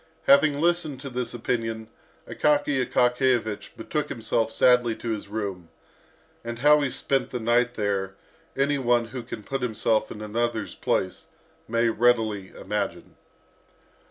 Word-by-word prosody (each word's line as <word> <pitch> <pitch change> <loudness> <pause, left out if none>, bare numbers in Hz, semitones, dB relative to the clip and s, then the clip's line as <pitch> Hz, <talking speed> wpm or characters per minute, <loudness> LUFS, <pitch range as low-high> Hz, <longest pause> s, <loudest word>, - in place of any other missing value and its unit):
Having 140 +1 +5
listened 165 -4 +1
to 140 -2 -7
this 125 -1 -2
opinion, 115 -2 -3 0.4
Akaky 145 -3 +1
Akakiyevich 125 -3 +1
betook 150 +6 -3
himself 115 0 -1
sadly 125 -2 +4
to 115 - -4
his 105 -2 -4
room. 100 -5 -5 0.7
And 120 0 -5
how 150 +4 +5
he 140 - 0
spent 135 0 -1
the 125 - -4
night 120 +2 +2
there, 100 -2 -1 0.4
any 140 +1 +2
one 120 -2 +2
who 125 +1 -5
can 110 - -8
put 135 +4 -3
himself 110 -2 0
in 105 - -7
another's 115 0 -2
place 95 - -2 0.4
may 115 +1 +2
readily 110 -4 +1
imagine. - - -4
120 Hz, 135 wpm, -25 LUFS, 110-130 Hz, 0.7 s, Having